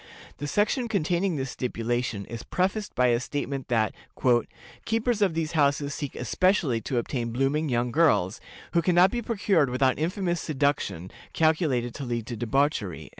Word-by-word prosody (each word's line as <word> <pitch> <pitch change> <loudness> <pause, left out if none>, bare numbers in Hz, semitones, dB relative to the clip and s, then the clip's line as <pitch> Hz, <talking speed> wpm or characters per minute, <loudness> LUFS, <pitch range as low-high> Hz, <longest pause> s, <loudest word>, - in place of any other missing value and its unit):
The 145 - -3
section 215 - +1
containing 180 -3 0
this 135 -2 -3
stipulation 120 -3 -2
is 115 0 -7
prefaced 195 +3 -2
by 125 0 +3
a 120 -1 +3
statement 140 0 -4
that 110 -3 +1 0.9
"keepers 225 0 0
of 190 -5 +2
these 165 -1 -1
houses 145 -2 +1
seek 145 -4 -5
especially 140 - +1
to 130 - -3
obtain 120 -1 -2
blooming 135 +5 0
young 120 0 0
girls, 110 - +2 0.3
who 170 - +4
can 175 +1 +1
not 180 +2 +6
be 240 - -2
procured 195 - +1
without 130 +2 +1
infamous 175 +1 -1
seduction, 135 - -1 0.2
calculated 155 -7 +1
to 140 - -6
lead 120 -3 -3
to 120 - -5
debauchery." 120 - -1
140 Hz, 160 wpm, -26 LUFS, 120-175 Hz, 0.9 s, not